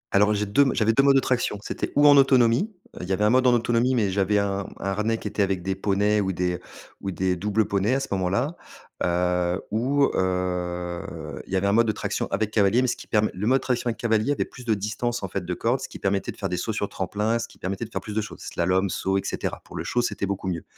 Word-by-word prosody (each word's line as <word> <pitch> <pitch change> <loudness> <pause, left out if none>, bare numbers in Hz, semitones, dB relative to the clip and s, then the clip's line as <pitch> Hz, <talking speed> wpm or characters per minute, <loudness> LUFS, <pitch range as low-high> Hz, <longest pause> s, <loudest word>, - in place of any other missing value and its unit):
Alors 105 +1 +5
j'ai 105 +1 0
2 100 +8 +3
m 140 - +3
j'avais 110 0 +3
2 135 - +5
modes 140 0 +5
de - - +6
traction. 125 -5 0
C'était - - -4
ou 145 +1 +6
en 145 - +8
autonomie, 130 - +4 0.3
heu, - - -7
il 90 - -6
y - - +2
avait 105 - 0
un 105 - +4
mode 130 0 +4
en 125 - +5
autonomie, 120 +2 +2
mais 105 -5 +1
j'avais 100 +2 +1
un 100 -1 -1
un - - -6
harnais 105 +3 0
qui 105 - -6
était 105 0 -2
avec 95 -3 0
des 95 - -1
poneys 105 +2 +1
ou 95 -1 0
des 90 0 -1 0.4
ou 95 - -3
des 95 0 0
doubles 105 +3 0
poneys 100 +6 +1
à - - +1
ce 135 - -4
moment-là. 100 - 0 0.5
Heu, 90 +1 +1
ou, 135 +6 +2
heu, 90 -3 -3
il - - -13
y - - 0
avait 95 +1 +1
un 100 - +3
mode 115 +1 +4
de 110 - +3
traction - - -3
avec 105 +2 -1
cavalier, 110 +3 +3
mais - - +1
ce 120 - 0
qui - - -12
permet 110 -1 +2
le 95 +4 -3
mode 130 +2 +4
traction 125 -1 -1
avec 115 - -1
cavalier 110 +3 +1
avait - - -1
plus 125 - -13
de 110 -2 +2
distance 110 +3 -3
en 95 - -3
fait 95 0 -3
de 90 +1 -3
corde, 120 +7 0
ce - - -6
qui - - -9
permettait 100 0 -1
de - - -16
faire 100 - -2
des 90 -1 -2
sauts 110 +5 -2
sur 100 -1 -2
tremplin, 105 +4 -1
ce 115 - -4
qui - - -19
permettait 95 +3 -4
de 110 - -6
faire - - -3
plus 105 - -7
de 110 - 0
choses, 105 - -8
slalom, 95 +3 0
saut 95 0 0
et 95 - -1
cetera. - - -3
Pour - - -12
le - - -3
show, 120 - 0
c'était 100 -4 -2
beaucoup 100 -1 -3
mieux. 85 -4 -2
105 Hz, 275 wpm, -25 LUFS, 95-115 Hz, 0.5 s, en